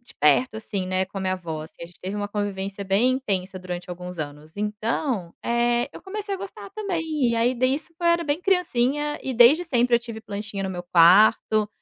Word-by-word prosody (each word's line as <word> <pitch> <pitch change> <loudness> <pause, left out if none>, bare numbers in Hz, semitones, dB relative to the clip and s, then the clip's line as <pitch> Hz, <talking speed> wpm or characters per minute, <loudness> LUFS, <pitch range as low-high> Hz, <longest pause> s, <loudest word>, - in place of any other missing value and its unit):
de 240 - -19
perto, 220 - +4
assim, 200 -4 -4
né, 185 0 0
com 195 - -14
a - - -4
minha 185 0 0
vó, 160 -4 -5
assim, 160 - -12
a - - -5
gente 175 - -17
teve 190 +2 -5
uma 205 0 -3
convivência 200 -1 -3
bem 200 +6 +3
intensa 195 -7 -2
durante 180 -1 -6
alguns 180 0 -7
anos 150 +1 -7
então, 210 - -2
eh, 240 0 +1
eu - - -10
comecei 400 +1 -4
a - - -3
gostar 290 - -8
também. 320 - -1
E - - 0
aí 240 +2 +2
disso 270 +7 -1
eu 345 - -1
era 340 0 +4
bem 295 -1 -1
criancinha 295 -6 +1
e 265 - -3
desde 250 +8 +6
sempre 245 -6 +2
eu - - 0
tive 230 -2 -8
plantinha 205 -1 -5
no 190 - -2
meu 180 -2 -5
quarto, 205 +5 +5
215 Hz, 215 wpm, -24 LUFS, 185-260 Hz, -, desde